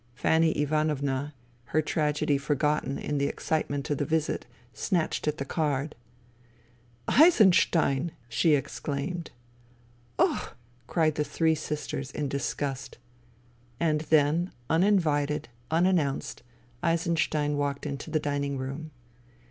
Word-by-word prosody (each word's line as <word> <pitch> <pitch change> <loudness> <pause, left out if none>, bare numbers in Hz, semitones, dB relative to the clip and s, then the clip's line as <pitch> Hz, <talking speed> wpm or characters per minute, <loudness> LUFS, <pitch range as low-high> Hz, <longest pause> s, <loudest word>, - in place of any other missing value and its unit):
Fanny 160 +6 +3
Ivanovna, 145 -2 0 0.3
her 155 +5 +1
tragedy 150 -2 +1
forgotten 150 -1 0
in 145 -1 -2
the 140 - +2
excitement 145 -3 -2
of 145 - 0
the - - +1
visit, 160 +1 -1 0.3
snatched 160 - -1
at 150 - 0
the 140 - -3
card. 150 -1 -1 0.6
" 120 0 -33
Eisenstein! 175 - +4
" 120 - -31
she 145 +7 +3
exclaimed. 145 +5 -3 0.5
" 120 0 -32
Och! - - 0
" 120 0 -33
cried 160 -2 +2
the 150 - 0
three 160 +1 +1
sisters 150 -3 -4
in 145 +1 -3
disgust. 140 0 -3 0.8
And 155 -2 +1
then, 160 +4 +3 0.2
uninvited, 160 -7 +2 0.2
unannounced, 165 -4 +1 0.4
Eisenstein 160 -3 +1
walked 145 0 -2
into 140 -1 -5
the 155 - +1
dining 140 -1 -2
room. 135 +4 -5
150 Hz, 120 wpm, -28 LUFS, 140-160 Hz, 0.8 s, Eisenstein